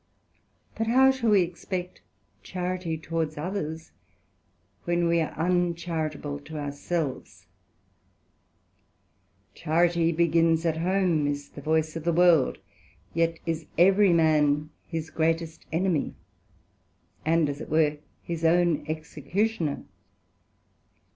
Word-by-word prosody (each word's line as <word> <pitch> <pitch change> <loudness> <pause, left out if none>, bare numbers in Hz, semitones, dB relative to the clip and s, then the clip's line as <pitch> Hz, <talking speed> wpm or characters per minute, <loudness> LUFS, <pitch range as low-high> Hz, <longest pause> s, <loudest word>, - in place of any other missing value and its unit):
But 225 - -2
how 265 +3 +6
shall 260 -4 -1
we 200 -3 +5
expect 180 +1 -5 0.4
Charity 180 -2 -3
towards 160 -1 -3
others, 160 -1 -4 0.9
when 175 0 +1
we 170 0 +3
are 160 - -4
uncharitable 165 -4 -1
to 155 +2 -9
our 145 -1 -3
selves? 140 - -4 2.1
Charity 170 +2 +2
begins 165 0 +2
at 160 -1 +1
home, 175 -3 +1
is 145 0 -3
the 145 - -10
voice 155 +1 0
of 165 - -5
the 170 - +1
World; 170 -4 +4 0.6
yet 165 0 +1
is 165 -1 -3
every 195 +3 +5
man 155 -2 +3 0.2
his 160 -1 -5
greatest 165 0 -1
enemy, 165 -2 0 1.1
and 165 -1 +2
as 145 +1 -4
it - - -8
were, 150 -1 +2 0.2
his 170 -1 -5
own 165 -2 +3
Executioner. 155 +3 -2
165 Hz, 110 wpm, -26 LUFS, 155-175 Hz, 2.1 s, how